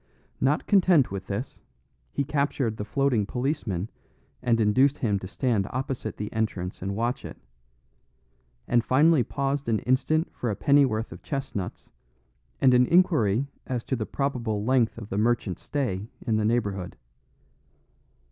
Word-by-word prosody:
Not 140 Hz, +3 st, +1 dB
content 180 Hz, -, +4 dB
with 95 Hz, -1 st, -5 dB
this, -, -, -5 dB, 0.5 s
he 140 Hz, -, -1 dB
captured 140 Hz, -5 st, 0 dB
the 105 Hz, -, -3 dB
floating 120 Hz, -2 st, +1 dB
policeman 125 Hz, -, -2 dB, 0.5 s
and 115 Hz, -2 st, +2 dB
induced 130 Hz, +7 st, +3 dB
him 105 Hz, -5 st, 0 dB
to 95 Hz, -, -7 dB
stand 110 Hz, -2 st, 0 dB
opposite 130 Hz, -3 st, -4 dB
the 105 Hz, -, -5 dB
entrance 100 Hz, -5 st, -2 dB
and 100 Hz, +1 st, -3 dB
watch 120 Hz, +4 st, -1 dB
it; -, -, -8 dB, 1.3 s
and 120 Hz, -1 st, +3 dB
finally 145 Hz, +5 st, +4 dB
paused 140 Hz, +2 st, -2 dB
an 110 Hz, -, +3 dB
instant 155 Hz, +6 st, +1 dB
for 120 Hz, -, -3 dB
a 105 Hz, -, -1 dB
pennyworth 130 Hz, -4 st, +2 dB
of -, -, -10 dB
chestnuts, 135 Hz, -, -5 dB, 0.7 s
and 130 Hz, -, +5 dB
an 125 Hz, 0 st, +5 dB
inquiry 140 Hz, -, +3 dB, 0.2 s
as 125 Hz, -3 st, -2 dB
to 130 Hz, -, -2 dB
the 110 Hz, -3 st, -3 dB
probable 120 Hz, -7 st, -2 dB
length 125 Hz, -3 st, +2 dB
of 110 Hz, -2 st, -8 dB
the 100 Hz, -, -1 dB
merchant's 115 Hz, -4 st, 0 dB
stay 110 Hz, -9 st, -2 dB, 0.2 s
in 110 Hz, -3 st, +1 dB
the 110 Hz, -, +1 dB
neighbourhood. 100 Hz, -5 st, -1 dB
120 Hz, 145 wpm, -26 LUFS, 105-140 Hz, 1.3 s, and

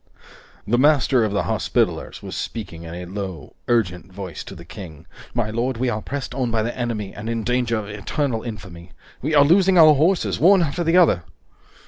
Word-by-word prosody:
The 120 Hz, +3 st, +1 dB
Master 140 Hz, -3 st, +4 dB
of 110 Hz, -, 0 dB
the 100 Hz, -, 0 dB
Hospitallers -, -, -1 dB
was -, -, -6 dB
speaking 100 Hz, -8 st, -5 dB
in 85 Hz, 0 st, -8 dB
a 90 Hz, 0 st, -6 dB
low, 95 Hz, -5 st, -6 dB
urgent 90 Hz, -7 st, 0 dB
voice 95 Hz, -2 st, -7 dB
to 95 Hz, -, -9 dB
the 85 Hz, -1 st, -12 dB
King: 85 Hz, -4 st, -10 dB, 0.3 s
"My 115 Hz, -3 st, 0 dB
lord, 120 Hz, +2 st, -1 dB
we 125 Hz, +1 st, 0 dB
are 110 Hz, -2 st, -2 dB
pressed 140 Hz, +2 st, -5 dB
on 130 Hz, -3 st, -1 dB
by 110 Hz, -1 st, 0 dB
the 120 Hz, +2 st, -3 dB
enemy 115 Hz, -5 st, -3 dB
and 110 Hz, +2 st, -6 dB
in 115 Hz, -1 st, -2 dB
danger 125 Hz, -1 st, 0 dB
of 105 Hz, -2 st, -5 dB
eternal 110 Hz, +4 st, -2 dB
infamy. 95 Hz, -7 st, -9 dB, 0.3 s
We 155 Hz, +4 st, 0 dB
are 145 Hz, -, +7 dB
losing 185 Hz, +4 st, +4 dB
our 155 Hz, -2 st, +8 dB
horses, 165 Hz, +6 st, +1 dB
one 185 Hz, +1 st, +6 dB
after 165 Hz, +3 st, -2 dB
the 165 Hz, +2 st, +3 dB
other!" 160 Hz, -, +4 dB
115 Hz, 195 wpm, -22 LUFS, 100-140 Hz, 0.3 s, our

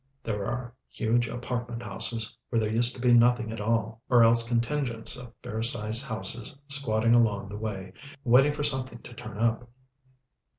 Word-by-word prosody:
There 105 Hz, -3 st, -2 dB
are 120 Hz, +1 st, -4 dB, 0.2 s
huge 120 Hz, +1 st, +1 dB
apartment 120 Hz, 0 st, -4 dB
houses 115 Hz, +1 st, -3 dB
where 115 Hz, -, +2 dB
there 110 Hz, -1 st, 0 dB
used 120 Hz, +2 st, +2 dB
to -, -, -10 dB
be 125 Hz, -1 st, +5 dB
nothing 120 Hz, -1 st, +4 dB
at 115 Hz, -1 st, -5 dB
all, 115 Hz, +1 st, -1 dB
or 120 Hz, -2 st, +7 dB
else 115 Hz, +1 st, +5 dB
contingents 115 Hz, 0 st, -1 dB
of 125 Hz, -1 st, -9 dB
fair 115 Hz, -3 st, -3 dB
sized 110 Hz, +1 st, 0 dB
houses 110 Hz, +1 st, -4 dB
squatting 115 Hz, -5 st, +2 dB
along 105 Hz, -4 st, +3 dB
the 105 Hz, -, -6 dB
way, 100 Hz, -4 st, -5 dB, 0.3 s
waiting 135 Hz, +4 st, +5 dB
for 150 Hz, -, -3 dB
something 130 Hz, -5 st, -2 dB
to 120 Hz, -, -11 dB
turn 115 Hz, -3 st, -8 dB
up. 115 Hz, +1 st, 0 dB
115 Hz, 170 wpm, -28 LUFS, 110-120 Hz, 0.3 s, or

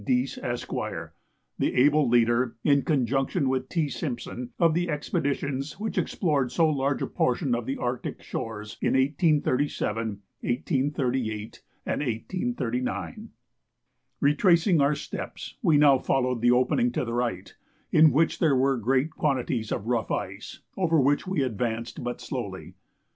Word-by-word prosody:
Dease, 125 Hz, +3 st, 0 dB
Esq., 120 Hz, 0 st, -4 dB, 0.9 s
the -, -, 0 dB
able 145 Hz, +1 st, +4 dB
leader, 120 Hz, 0 st, +3 dB
in 140 Hz, -2 st, +4 dB
conjunction 135 Hz, +2 st, 0 dB
with 130 Hz, 0 st, -1 dB
T. 165 Hz, -4 st, 0 dB
Simpson, 125 Hz, -4 st, -5 dB
of 165 Hz, -2 st, +4 dB
the 175 Hz, +1 st, 0 dB
expeditions 145 Hz, -2 st, -2 dB
which 220 Hz, +1 st, -3 dB
explored 145 Hz, -, 0 dB
so 160 Hz, +5 st, +3 dB
large 140 Hz, -2 st, 0 dB
a -, -, +1 dB
portion 125 Hz, +1 st, 0 dB
of 120 Hz, -1 st, -2 dB
the 135 Hz, -, -2 dB
Arctic 125 Hz, 0 st, -3 dB
shores 105 Hz, -2 st, -6 dB
in -, -, +1 dB
1837, 135 Hz, -, +1 dB, 0.3 s
1838, 125 Hz, -5 st, -1 dB, 0.2 s
and -, -, -1 dB
1839. 125 Hz, -, -3 dB, 0.9 s
Retracing 170 Hz, +3 st, +4 dB
our 140 Hz, +2 st, +3 dB
steps, -, -, -7 dB
we 165 Hz, -, +4 dB
now 145 Hz, -2 st, +6 dB
followed 125 Hz, -3 st, 0 dB
the 120 Hz, -, +4 dB
opening 130 Hz, -, +3 dB
to -, -, -1 dB
the 115 Hz, -, -4 dB
right, 120 Hz, -6 st, -2 dB, 0.4 s
in 155 Hz, -1 st, +7 dB
which 160 Hz, +3 st, +2 dB
there 155 Hz, -5 st, +3 dB
were 135 Hz, +1 st, +2 dB
great 130 Hz, +6 st, +1 dB
quantities 125 Hz, -6 st, -1 dB
of 100 Hz, -, -2 dB
rough 115 Hz, -2 st, 0 dB
ice, 100 Hz, +3 st, -4 dB
over 165 Hz, -4 st, +2 dB
which 145 Hz, +6 st, +2 dB
we 185 Hz, -7 st, 0 dB
advanced 115 Hz, -1 st, -3 dB
but 120 Hz, 0 st, -4 dB
slowly. 100 Hz, -8 st, -6 dB
135 Hz, 140 wpm, -26 LUFS, 120-150 Hz, 0.9 s, in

